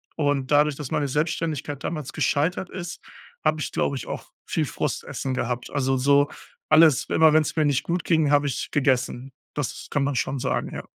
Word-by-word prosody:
Und 145 Hz, -3 st, 0 dB
dadurch, 150 Hz, 0 st, +4 dB
dass 145 Hz, -3 st, -6 dB
meine 145 Hz, -, 0 dB
Selbstständigkeit 150 Hz, -1 st, -2 dB
damals 155 Hz, -5 st, -4 dB
gescheitert 165 Hz, +5 st, 0 dB
ist, 175 Hz, -2 st, -7 dB, 0.4 s
habe 155 Hz, 0 st, +2 dB
ich, -, -, -3 dB
glaube 140 Hz, -, 0 dB
ich, -, -, -7 dB
auch -, -, -6 dB
viel -, -, 0 dB
Frustessen 135 Hz, -, -3 dB
gehabt. 125 Hz, -1 st, -2 dB
Also, 135 Hz, -2 st, +1 dB
so 140 Hz, +2 st, +4 dB, 0.4 s
alles 155 Hz, -4 st, +6 dB
immer 160 Hz, -1 st, +5 dB
wenn's 155 Hz, -1 st, +2 dB
mir 155 Hz, -, +3 dB
nicht 145 Hz, -2 st, +1 dB
gut 170 Hz, 0 st, -1 dB
ging, 160 Hz, -4 st, +3 dB
habe 145 Hz, 0 st, +4 dB
ich 135 Hz, -, -3 dB
gegessen. 130 Hz, -2 st, 0 dB, 0.2 s
Das 145 Hz, -4 st, -4 dB
kann 145 Hz, -, +1 dB
man 140 Hz, 0 st, -1 dB
schon 130 Hz, +2 st, -1 dB
sagen, -, -, -2 dB
ja. -, -, -6 dB
145 Hz, 185 wpm, -24 LUFS, 135-155 Hz, 0.4 s, alles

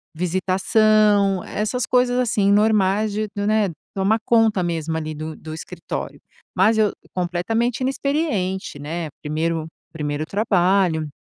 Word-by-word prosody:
visitação, 195 Hz, +2 st, +2 dB
essas 215 Hz, +4 st, -2 dB
coisas, 250 Hz, 0 st, +2 dB
assim, 215 Hz, -5 st, +2 dB
normais 210 Hz, 0 st, +3 dB
de, 215 Hz, +1 st, -2 dB
né, 210 Hz, -1 st, +2 dB, 0.2 s
tomar 195 Hz, +3 st, +2 dB
conta 225 Hz, -5 st, +3 dB
mesmo 165 Hz, -1 st, -2 dB
ali 155 Hz, -1 st, -4 dB
do 155 Hz, +1 st, -6 dB
do 155 Hz, 0 st, -9 dB
escritório. 160 Hz, -, -6 dB, 0.4 s
Mas 215 Hz, +4 st, +4 dB
eu 215 Hz, -2 st, +3 dB, 0.2 s
completamente 205 Hz, +8 st, -1 dB
inexperiente, 255 Hz, -, -1 dB
né. 160 Hz, +2 st, -4 dB
Primeiro 160 Hz, +1 st, -2 dB, 0.3 s
primeiro 150 Hz, -1 st, -3 dB
trabalho. 185 Hz, -5 st, +1 dB
195 Hz, 120 wpm, -21 LUFS, 165-215 Hz, 0.4 s, Mas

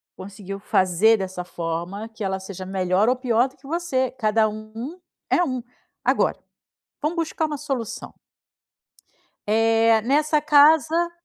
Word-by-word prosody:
conseguiu 195 Hz, 0 st, -8 dB
fazer 195 Hz, +3 st, +3 dB
dessa 185 Hz, -2 st, -5 dB
forma 175 Hz, +5 st, -5 dB
que 225 Hz, -1 st, -8 dB
ela 190 Hz, -1 st, -2 dB
seja 190 Hz, -1 st, -8 dB
melhor 190 Hz, +3 st, +1 dB
ou 255 Hz, -, +3 dB
pior 245 Hz, -1 st, +1 dB
do 260 Hz, -, -25 dB
que 270 Hz, -, -16 dB
você, 280 Hz, -6 st, -1 dB
cada 220 Hz, -3 st, +1 dB
um 220 Hz, +9 st, -7 dB, 0.3 s
é 355 Hz, -, +3 dB
um. 255 Hz, -6 st, -2 dB, 0.4 s
Agora, -, -, +2 dB, 0.6 s
vamos 305 Hz, +3 st, -1 dB
buscar 325 Hz, -1 st, -1 dB
uma 300 Hz, -1 st, -3 dB
solução. 270 Hz, -6 st, -5 dB, 1.3 s
Eh, 225 Hz, +1 st, +3 dB
nessa 300 Hz, +5 st, +2 dB
casa, 310 Hz, +3 st, +4 dB
225 Hz, 135 wpm, -23 LUFS, 195-285 Hz, 1.3 s, casa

